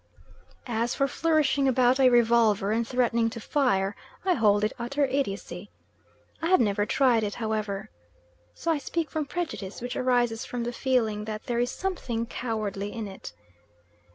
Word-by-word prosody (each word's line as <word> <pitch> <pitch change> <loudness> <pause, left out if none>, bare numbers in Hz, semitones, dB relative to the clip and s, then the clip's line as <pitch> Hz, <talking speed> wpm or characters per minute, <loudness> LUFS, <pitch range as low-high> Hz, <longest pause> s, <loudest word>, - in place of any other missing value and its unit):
As 235 0 -1
for 275 - +2
flourishing 295 -3 +2
about 255 0 +3
a 260 -1 +6
revolver 230 -4 +3
and 230 +1 0
threatening 235 -2 +1
to 230 - -7
fire, 215 -7 +1 0.3
I 370 - +4
hold 210 -6 +3
it 215 - +1
utter 275 +5 0
idiocy. 260 -7 -3 0.7
I 325 - 0
have 370 +1 +5
never 205 -2 +1
tried 250 -5 +3
it, 205 -1 -2
however, 215 - -3 0.6
so 335 - -1
I 315 - +1
speak 320 +3 -3
from 305 -2 -2
prejudice 315 - -4
which 245 0 -5
arises 240 -3 +1
from 245 -1 -4
the 240 +1 -3
feeling 225 -5 0
that 215 -1 -5
there 235 -1 -1
is 245 0 +1
something 260 -12 -3
cowardly 210 -4 -3
in 225 -3 -5
it. 190 - -9
235 Hz, 160 wpm, -27 LUFS, 215-265 Hz, 0.7 s, a